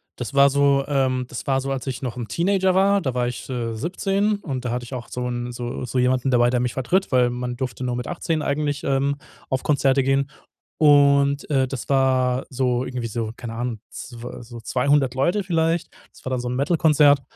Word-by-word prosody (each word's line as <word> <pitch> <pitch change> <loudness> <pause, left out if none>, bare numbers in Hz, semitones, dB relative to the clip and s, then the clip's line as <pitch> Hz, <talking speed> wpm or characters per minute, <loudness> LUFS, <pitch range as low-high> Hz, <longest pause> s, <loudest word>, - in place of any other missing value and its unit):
das 125 +2 -6
war 140 0 +6
so, 140 0 +3
ähm 130 -3 +1
das 120 - -7
war 135 -1 +2
so, 135 +1 -4
als 130 -3 -3
ich 130 - -4
noch 125 -3 -4
'n 120 -3 -6
Teenager 185 - +2
war, 195 +1 +3
da 130 -6 -2
war 125 -1 0
ich, 125 +2 -6
äh, 120 -3 -3
17 195 - 0
und 135 -10 -5
da 120 - -2
hatte 125 0 -3
ich 120 - -10
auch 125 -2 -6
so 125 0 -3
'n 120 0 -3
so 120 0 -5
so 125 +1 -2
jemanden 125 +1 +2
dabei, 120 -1 +4
der 125 0 +1
mich 125 -1 -1
vertritt, 180 +9 0
weil 125 -2 +4
man 125 0 -4
durfte 125 -1 -4
nur 125 -1 -1
mit 125 - -5
18 165 -2 -2
eigentlich, 145 0 -1
ähm, 140 +1 +1 0.3
auf 130 0 -1
Konzerte 140 -2 +3
gehen. 135 +1 +1 0.5
Und, 140 -1 +4
äh, 135 -3 +2
das 130 -2 -6
war 130 -1 +2
so 125 -1 0
irgendwie 125 -2 -4
so, 115 0 -3
keine 115 -2 -7
Ahnung, 120 -1 -3
zw 120 -1 -8
so 120 0 -10
200 130 +2 +1
Leute 175 +10 +1
vielleicht. 165 -1 0 0.2
Das - - -19
war 130 - -4
dann 130 -1 -1
so 125 - -4
'n 125 - -2
Metal-Konzert. 150 -1 +4
130 Hz, 220 wpm, -23 LUFS, 125-140 Hz, 0.5 s, war